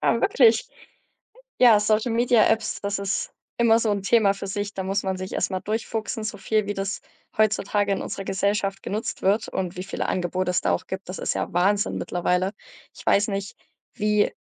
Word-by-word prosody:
Ah, 230 - +2
wirklich? 230 -4 +4 0.9
Ja, 235 -4 +7
Social 215 +2 +1
Media 235 -1 +4
Apps, 225 0 0
das 200 0 -2
ist 200 0 -2 0.3
immer 230 -1 +5
so 225 -2 0
'n 200 -1 -1
Thema 205 -2 +3
für 195 0 -7
sich. 205 +1 -4
Da 190 - -3
muss 195 +2 -1
man 190 -1 -2
sich 185 0 -6
erst - - -1
mal 185 -1 -2
durchfuchsen, 220 +1 -3
so 215 - -4
viel 215 +1 0
wie 205 - -2
das 195 +1 -3 0.4
heutzutage 205 -1 +2
in 195 - -1
unserer 195 - -5
Gesellschaft 195 +1 -1
genutzt 215 +3 -4
wird 205 +3 +2
und 180 -1 -3
wie 180 - -5
viele 195 - -3
Angebote 180 0 -1
es 180 - +1
da - - +1
auch 185 - -2
gibt. 190 -1 -6
Das 180 - -6
ist - - -1
ja - - -3
Wahnsinn 200 +4 +1
mittlerweile. 180 +2 0 0.4
Ich - - -13
weiß 205 +2 +3
nicht, 200 0 -4 0.4
wie 210 -2 +1
200 Hz, 200 wpm, -24 LUFS, 190-215 Hz, 0.9 s, Ja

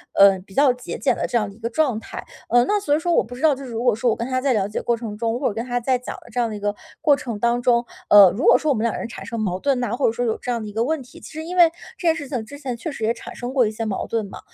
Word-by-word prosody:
呃， 195 -1 +6
比 190 +1 -16
较 275 -3 +5
节 250 0 -7
俭 - - +1
的 - - -2
这 240 - +1
样 210 -3 0
的 200 - -13
一 230 - -20
个 230 +1 -3
状 255 -4 +1
态。 - - -8 0.3
呃， 240 +1 +5
那 415 0 +1
所 295 -8 +1
以 - - 0
说 345 - +1
我 - - +5
不 245 +2 -10
知 255 - -10
道， 315 -2 +5
就 275 - -9
是 245 - -8
如 230 +1 -3
果 245 - +4
说 235 +2 +1
我 - - +2
跟 235 - -4
他 255 0 0
在 270 -1 +2
了 205 -4 +1
解 210 - -4
过 235 - +1
程 220 -3 -6
中， 230 +1 -1
或 275 - +1
者 - - -5
跟 225 +3 -4
他 245 -1 -2
在 255 +1 +1
讲 250 - -7
的 - - -16
这 245 - -2
样 235 -2 +1
的 215 - -5
一 205 - -6
个 205 0 -1 0.3
过 300 -2 +5
程 235 -6 -5
当 235 +2 +1
中， 240 -1 +3 0.2
呃， 200 -3 +9
如 250 - -3
果 - - +7
说 305 -2 0
我 - - +2
们 220 - -2
两 235 - 0
人 - - -4
产 - - -9
生 230 - -5
矛 185 -4 -1
盾 275 +2 +1
呐， 240 - -2
或 275 - +1
者 220 - +4
说 245 +1 -2
有 225 - 0
这 - - -8
样 235 -2 -1
的 215 - -6
一 - - -10
个 225 +1 0
问 315 0 -1
题 250 - -15
其 - - -11
实 315 - -5
因 360 +3 -5
为 340 -2 +7 0.3
这 345 - -2
件 320 - +4
事 290 -4 -6
情 245 -6 -3
之 285 +5 -10
前 260 -4 -4
确 280 - -5
实 250 - -7
也 225 +2 +2
产 235 - -10
生 245 +1 -5
过 255 -5 +3
一 215 - -3
些 225 +1 -5
矛 200 -3 -3
盾 225 -2 -1
嘛， - - -10
240 Hz, 400 characters per minute, -22 LUFS, 220-270 Hz, 0.3 s, 呃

